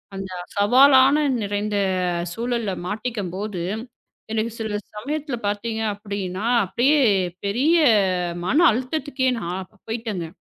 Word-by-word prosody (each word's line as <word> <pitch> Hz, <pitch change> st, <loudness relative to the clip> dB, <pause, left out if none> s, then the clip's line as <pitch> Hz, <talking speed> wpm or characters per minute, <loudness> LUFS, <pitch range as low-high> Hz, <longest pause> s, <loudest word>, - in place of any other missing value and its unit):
அந்தச் 185 Hz, -2 st, -7 dB
சவாலான 265 Hz, +6 st, +6 dB, 0.2 s
நிறைந்த 205 Hz, 0 st, -2 dB, 0.6 s
சூழல்ல 235 Hz, -3 st, -2 dB
மாட்டிக்கும்போது, 205 Hz, -3 st, -4 dB, 0.7 s
எனக்குச் 225 Hz, +1 st, -2 dB
சில 215 Hz, -2 st, -2 dB, 0.2 s
சமயத்துல 285 Hz, +3 st, -3 dB
பாத்தீங்கன்னா 205 Hz, -2 st, -3 dB, 0.2 s
அப்படியே 265 Hz, -, +2 dB, 0.5 s
பெரிய 270 Hz, +12 st, +2 dB, 0.7 s
மன 295 Hz, -, +2 dB
அழுத்தத்துக்கே 260 Hz, +2 st, -2 dB
நான் 180 Hz, 0 st, -5 dB, 0.2 s
பேயிட்டேன்ங்க. 220 Hz, -7 st, -4 dB
220 Hz, 85 wpm, -23 LUFS, 200-250 Hz, 0.7 s, சவாலான